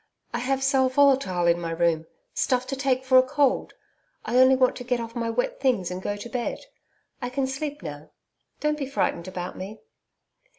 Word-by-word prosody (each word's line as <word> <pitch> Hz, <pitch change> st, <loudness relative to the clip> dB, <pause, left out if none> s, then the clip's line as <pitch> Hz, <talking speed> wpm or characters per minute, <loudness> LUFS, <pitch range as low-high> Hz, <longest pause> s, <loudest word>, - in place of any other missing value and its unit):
I 240 Hz, -, -1 dB
have 270 Hz, +2 st, 0 dB
sal 265 Hz, -1 st, +3 dB
volatile 260 Hz, -10 st, +3 dB
in 170 Hz, 0 st, +3 dB
my 165 Hz, -, -3 dB
room 165 Hz, -1 st, +1 dB, 0.3 s
stuff 255 Hz, -1 st, +1 dB
to 265 Hz, +1 st, -3 dB
take 265 Hz, -1 st, 0 dB
for 260 Hz, 0 st, +7 dB
a -, -, +8 dB
cold. 265 Hz, +1 st, +1 dB, 0.5 s
I 240 Hz, +3 st, +2 dB
only 260 Hz, +1 st, +7 dB
want 255 Hz, -1 st, +3 dB
to 250 Hz, -, -6 dB
get 245 Hz, 0 st, 0 dB
off 230 Hz, 0 st, -6 dB
my 230 Hz, -1 st, -1 dB
wet 240 Hz, +2 st, -1 dB
things 235 Hz, -10 st, +1 dB
and 180 Hz, +1 st, -4 dB
go 205 Hz, -, -2 dB
to 205 Hz, +3 st, -7 dB
bed 240 Hz, -, -4 dB, 0.6 s
I 245 Hz, -, -2 dB
can 265 Hz, +1 st, -1 dB
sleep 280 Hz, -, -4 dB
now. 150 Hz, -1 st, -7 dB, 0.5 s
Don't 300 Hz, 0 st, 0 dB
be 275 Hz, -, -2 dB
frightened 185 Hz, -10 st, -1 dB
about 180 Hz, -1 st, -5 dB
me.' 200 Hz, +4 st, -7 dB
250 Hz, 200 wpm, -25 LUFS, 185-265 Hz, 0.6 s, a